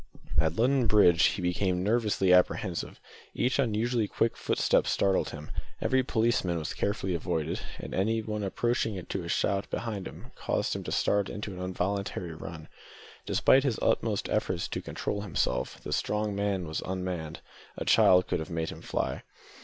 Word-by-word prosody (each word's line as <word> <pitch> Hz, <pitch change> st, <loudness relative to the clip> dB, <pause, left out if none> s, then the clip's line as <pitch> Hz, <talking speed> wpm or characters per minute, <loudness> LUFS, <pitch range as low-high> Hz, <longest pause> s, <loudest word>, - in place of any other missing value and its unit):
At 80 Hz, +1 st, +2 dB
London 125 Hz, +2 st, +3 dB
Bridge 95 Hz, -5 st, +5 dB
he 95 Hz, -, +1 dB
became 90 Hz, +1 st, 0 dB
nervously 105 Hz, -4 st, +2 dB
apprehensive. 90 Hz, 0 st, +1 dB, 0.4 s
Each 125 Hz, +3 st, +1 dB
unusually 115 Hz, -2 st, +1 dB
quick 115 Hz, +3 st, 0 dB
footstep -, -, +1 dB
startled 95 Hz, -1 st, +2 dB
him. 75 Hz, 0 st, -9 dB, 0.3 s
Every 130 Hz, 0 st, +2 dB
policeman 110 Hz, -8 st, +1 dB
was 80 Hz, -2 st, -3 dB
carefully 100 Hz, -2 st, -1 dB
avoided, 80 Hz, -1 st, -2 dB, 0.2 s
and -, -, -7 dB
anything 105 Hz, +1 st, 0 dB
approaching 110 Hz, -2 st, -1 dB
to 95 Hz, -, -4 dB
a 85 Hz, -, -6 dB
shout 100 Hz, +2 st, 0 dB
behind 105 Hz, -5 st, -3 dB, 0.3 s
caused -, -, -1 dB
him -, -, -4 dB
to -, -, -4 dB
start 100 Hz, -1 st, +1 dB
into 105 Hz, -1 st, -5 dB
an 90 Hz, -, -7 dB
involuntary 90 Hz, -1 st, -2 dB
run. 80 Hz, 0 st, -8 dB, 0.6 s
Despite 135 Hz, 0 st, +4 dB
his 130 Hz, -6 st, 0 dB
utmost -, -, +1 dB
efforts -, -, -1 dB
to -, -, -3 dB
control 100 Hz, -, -3 dB
himself, 70 Hz, -9 st, -1 dB
the -, -, -3 dB
strong 105 Hz, 0 st, 0 dB
man 100 Hz, -3 st, -1 dB
was 80 Hz, -, -3 dB
unmanned; 90 Hz, -4 st, -4 dB, 0.4 s
a -, -, -4 dB
child 90 Hz, 0 st, +6 dB
could -, -, 0 dB
have 80 Hz, -, -5 dB
made 80 Hz, -1 st, -2 dB
him -, -, -8 dB
fly. -, -, -2 dB
100 Hz, 160 wpm, -29 LUFS, 90-110 Hz, 0.6 s, child